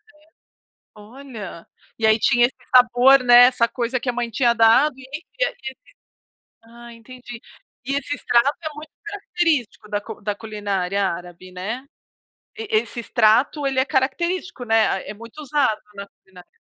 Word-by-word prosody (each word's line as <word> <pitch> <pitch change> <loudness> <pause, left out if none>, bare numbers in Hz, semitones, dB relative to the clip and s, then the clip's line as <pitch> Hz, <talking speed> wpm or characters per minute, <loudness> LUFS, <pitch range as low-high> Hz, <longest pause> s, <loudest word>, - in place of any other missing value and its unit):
É. 305 +1 -26 0.7
Olha, 215 -5 -11 0.3
e 220 - 0
aí 220 0 +5
tinha 240 +1 +3
esse 255 - -4 0.2
sabor, 250 +2 +6
né, 245 0 +8
essa 235 -2 +1
coisa 245 +1 -3
que 245 - -4
a - - -1
mãe 240 -1 -3
tinha 235 +1 +2
dado 235 +6 +4
e 265 - -13
esse 310 +4 -7 0.2
e - - +5
aquele, 265 - -7 0.9
ah 235 +1 -14
entendi. 245 +1 -12 0.5
E 275 +1 -2
esse 285 +1 -3
extrato 245 +1 +2
é 310 - -3
muito 300 +1 -11
característico 335 - -2
da 205 0 -2
cu 205 - -10
da 205 0 -3
culinária 200 -3 -3
árabe, 175 +1 -6
né. 215 +9 -6 0.7
E 445 -1 -6
esse 245 - -3
extrato 235 +6 +2
ele 265 -1 0
é 260 - +2
característico, 305 +2 -2
né, 225 -4 +1
é - - -5
muito 230 +7 -12
usado 280 -6 0
na 200 0 -8
culinária. 185 -3 -19
240 Hz, 165 wpm, -21 LUFS, 215-275 Hz, 0.9 s, né